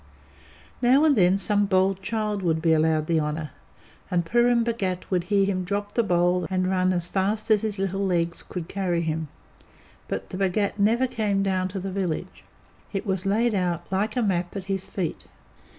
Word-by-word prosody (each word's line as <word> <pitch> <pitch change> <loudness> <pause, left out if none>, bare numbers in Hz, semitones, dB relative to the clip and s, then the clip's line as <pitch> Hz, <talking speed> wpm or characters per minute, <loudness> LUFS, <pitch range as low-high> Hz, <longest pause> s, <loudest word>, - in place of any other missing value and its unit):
Now 260 +4 +5
and 305 -3 +5
then 185 -2 +4
some 205 +1 +2
bold 190 0 +2
child 210 0 -2
would 165 -3 +1
be 160 0 +3
allowed 155 -1 +2
the 165 0 +1
honour, 150 -1 -3 0.6
and 175 -3 0
Purun 240 +4 +3
Bhagat 195 -7 -2
would 180 -2 +1
hear 200 0 +2
him 185 -2 -1
drop 205 +3 -3
the 235 - +3
bowl 180 -3 +1
and 185 -1 0
run 185 0 +2
as 175 -2 -1
fast 205 +5 -1
as 210 -2 +5
his 215 -2 -1
little 195 0 -1
legs 170 -3 0
could 175 -3 -6
carry 180 -4 -1
him, 160 -1 -2 0.8
but - - -5
the - - -4
Bhagat 200 +2 0
never 230 +5 +3
came 210 -5 0
down 185 -1 0
to 190 +1 -5
the 190 +1 -4
village. 185 -4 -3 0.5
It 195 +1 -3
was 190 -1 -1
laid 225 +4 +2
out 180 -4 -1
like 205 +3 0
a 245 - +2
map 180 -3 -1
at 195 - -3
his 195 -1 -3
feet. 180 -4 -4
190 Hz, 190 wpm, -25 LUFS, 175-205 Hz, 0.8 s, Now